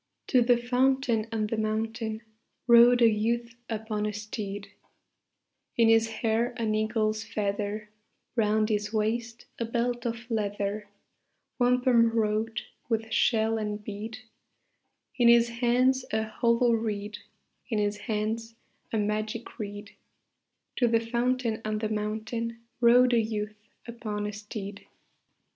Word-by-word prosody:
To 255 - +5
the 240 0 +4
fountain 245 -2 +1
on 220 -1 0
the 220 +1 -2
mountain 220 +1 -2 0.4
Rode 240 0 +7
a - - +8
youth 230 +2 0 0.2
upon 215 -1 -2
a - - -1
steed; 205 -1 -5 1.1
In 230 -1 +5
his 225 0 +5
hair 225 +2 -1
an 225 -2 0
eagle's 215 0 0
feather; 210 0 -3 0.4
Round 215 -1 +2
his 210 -1 -1
waist 230 +2 -2
a 230 - 0
belt 240 +1 -1
of 230 0 -4
leather, 205 -1 -2 0.7
Wampum 245 -1 +4
wrought 220 0 0 0.3
with 225 -1 -1
shell 225 -1 +2
and 210 -1 -4
bead; 215 +2 -6 1.0
In 240 - +6
his 235 0 +6
hands 250 +2 +2
a 220 0 +1
hollow 235 +2 +2
reed, 210 -2 -2 0.5
In 225 - 0
his 205 0 0
hands 220 +2 -3 0.4
a 225 - 0
magic 215 +3 -3
reed: 205 -1 -6 0.9
To 245 - +3
the 230 0 +3
fountain 235 0 -1
on 215 0 -1
the 215 0 -2
mountain 220 +2 -3 0.2
Rode 245 +1 +6
a 235 - +5
youth 210 -1 -4 0.3
upon 215 -3 -4
a 210 - -4
steed. 210 -1 -7
225 Hz, 130 wpm, -28 LUFS, 215-235 Hz, 1.1 s, a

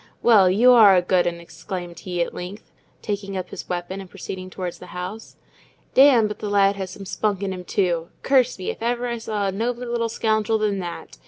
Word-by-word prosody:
"Well, 205 -6 +6
you 230 +7 +5
are 215 -6 +8
a 180 - +4
good 180 0 +2
'un!" 170 0 -3
exclaimed 175 0 -7
he, 175 -2 -2
at - - -7
length, 190 +4 -8 0.3
taking 200 -2 -3
up 185 -1 -5
his - - -8
weapon 180 +2 -4
and 190 - -11
proceeding 185 -1 -7
towards 180 -2 -6
the 180 - -11
house. 195 +5 -7 0.6
"Damme, 260 -5 +6
but 210 - -7
the 210 - -4
lad 200 0 +3
has 190 -1 -5
some 195 +2 -9
spunk 200 0 -1
in 195 -1 -2
him, 180 -1 -7
too. 175 -3 -1
Curse 260 -2 +3
me, 185 - -3
if - - -12
ever 240 +1 -1
I 235 -1 -3
saw 215 -2 -2
a 195 - 0
nobler 235 +5 -2
little 235 -1 -1
scoundrel 220 -1 +1
than 210 -2 0
that. 175 -3 -7
195 Hz, 220 wpm, -23 LUFS, 180-220 Hz, 0.6 s, are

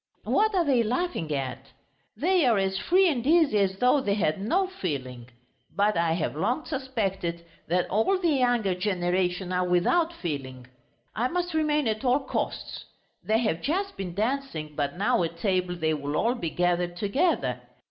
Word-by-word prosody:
"What 430 0 +2
are 350 -2 +2
they 265 -5 +3
laughing 240 - -2
at? 135 -1 -4 0.4
They 360 - +2
are 230 -3 +4
as 195 0 0
free 375 +2 +4
and 265 -8 0
easy 310 -9 +4
as 190 -1 +1
though 250 +5 +3
they 200 -4 0
had 190 -3 0
no 360 - +1
feeling.... 130 - -5 0.5
But 205 +1 +2
I 165 -1 +2
have 165 -3 -2
long 235 - -1
suspected 195 - -3 0.2
that 180 +2 +1
all 220 - +2
the 350 -2 +1
younger 245 -8 +2
generation 180 -1 -1
are 180 0 +1
without 320 - +2
feeling! 135 - -5 0.5
I 235 +3 +1
must 355 +3 -2
remain 300 -3 +1
at 215 +1 -1
all 260 +2 +3
costs! - - -4 0.4
They 220 - +2
have 195 -8 -1
just 390 +6 -1
been 180 -3 -5
dancing, 220 - -2
but 145 +2 -2
now 200 -1 +2
at 165 0 -3
table 180 -1 0
they 160 -2 0
will 145 0 -3
all 235 +2 +2
be 175 -10 -3
gathered 175 0 0
together.... 270 - 0
200 Hz, 170 wpm, -26 LUFS, 175-275 Hz, 0.5 s, are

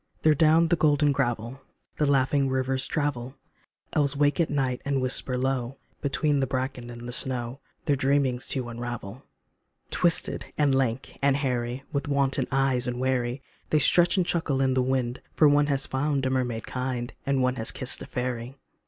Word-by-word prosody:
There 155 - +6
down 160 +2 +4
the 170 - +4
golden 150 -2 +3
gravel 120 -1 -2 0.4
The 150 - +1
laughing 135 0 +2
rivers 130 0 0
travel; 135 -4 -2 0.6
Elves 140 -2 +1
wake 145 0 +2
at 165 - +2
nights 130 -3 -1
and 140 -1 0
whisper 130 0 0
low 130 0 -2 0.2
Between 145 +1 +1
the 135 - 0
bracken 130 -1 -3
and 120 0 -8
the - - -5
snow 125 0 0 0.3
Their 145 - +2
dreamings 135 -2 +1
to 130 -3 -1
unravel. 120 -1 -6 0.7
Twisted 170 -2 +1
and 145 -2 +3
lank 130 -1 -1
and 140 0 +3
hairy, 125 -2 -2
With 140 +2 -2
wanton 135 -2 +1
eyes 130 -2 +1
and 125 0 -3
wary, 130 0 -1 0.3
They 155 - +3
stretch 175 +4 +5
and 185 - +2
chuckle 160 -6 -1
in 135 -1 +2
the 130 - +2
wind, 125 -1 -1
For 155 - +6
one 145 0 +4
has 140 -1 +1
found 140 0 -1
a 130 - 0
mermaid 125 -3 -1
kind, 125 -1 -4
And 135 -2 +2
one 125 0 0
has 110 - -1
kissed 130 -2 -2
a - - -7
fairy. 125 0 -4
135 Hz, 180 wpm, -26 LUFS, 125-140 Hz, 0.7 s, There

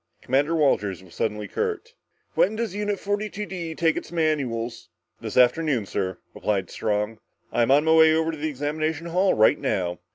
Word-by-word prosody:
Commander 145 +6 +1
Walters 105 - +1
was 90 - -17
suddenly 105 -1 -2
curt. 450 +1 -3 0.4
"When 205 +4 +2
does 225 -4 -2
Unit 205 -1 -2
42 205 0 -3
D 170 -5 -5
take 165 -1 +2
its - - -6
manuals?" 130 -8 -1 0.3
"This - - -5
afternoon, 125 -1 +3
sir," 95 -1 -3 0.2
replied 95 -4 -2
Strong. 105 +1 -2 0.3
"I'm 120 0 +2
on 140 +2 +5
my 160 0 +4
way 160 0 +7
over 160 0 +1
to 160 - -7
the 155 +1 -1
examination 155 +3 -2
hall 180 +3 +2
right 110 0 +4
now." 90 -2 -1
155 Hz, 170 wpm, -24 LUFS, 115-170 Hz, 0.4 s, way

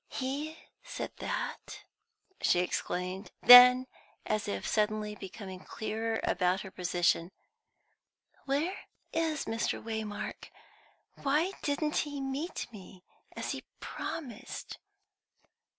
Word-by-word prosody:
"He 285 +5 -3 0.3
said - - -5
that?" - - -4 0.6
she - - +4
exclaimed. 180 +2 -3
Then, 250 +1 +11 0.4
as 215 -1 -1
if 200 - -3
suddenly 215 0 0
becoming 195 -1 -8
clearer 225 +3 -3
about 185 +1 +1
her 190 - -8
position: 175 -1 +1 1.2
"Where 290 +7 0 0.4
is 320 -3 0
Mr. 225 +1 -1
Waymark? 220 -2 -5 0.8
Why 300 +7 +2
didn't 300 +1 0
he 290 -1 -1
meet 275 +5 -3
me 185 -2 -12 0.3
as - - -3
he - - -5 0.2
promised?" 245 -9 -6
225 Hz, 100 wpm, -31 LUFS, 195-280 Hz, 1.2 s, Then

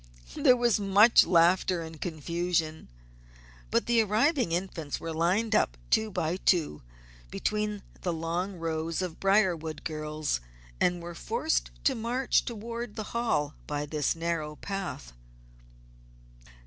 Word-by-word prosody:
There 250 - +4
was 240 -3 +2
much 205 +3 +6
laughter 175 0 +3
and 160 -1 -10
confusion; 165 0 -2 0.8
but - - +1
the 235 -1 +4
arriving 225 - +2
Infants 170 -4 -3
were 165 -1 -5
lined 185 +8 +1
up - - +2
two 220 0 +3
by 180 -3 -1
two 165 - +1 0.5
between 210 - -2 0.2
the 180 - -1
long 170 +4 -2
rows 165 +1 -2
of 175 -3 -5
Briarwood 180 -6 +1
girls 155 - -2 0.4
and 175 -1 +1
were 175 0 -6
forced 320 - -1
to 270 - +3
march 245 +2 0
toward 235 0 -5
the 215 -3 -6
Hall 190 -11 0
by 145 0 -2
this 150 0 0
narrow 165 -2 -2
path. 190 - -5
175 Hz, 125 wpm, -29 LUFS, 160-215 Hz, 0.8 s, much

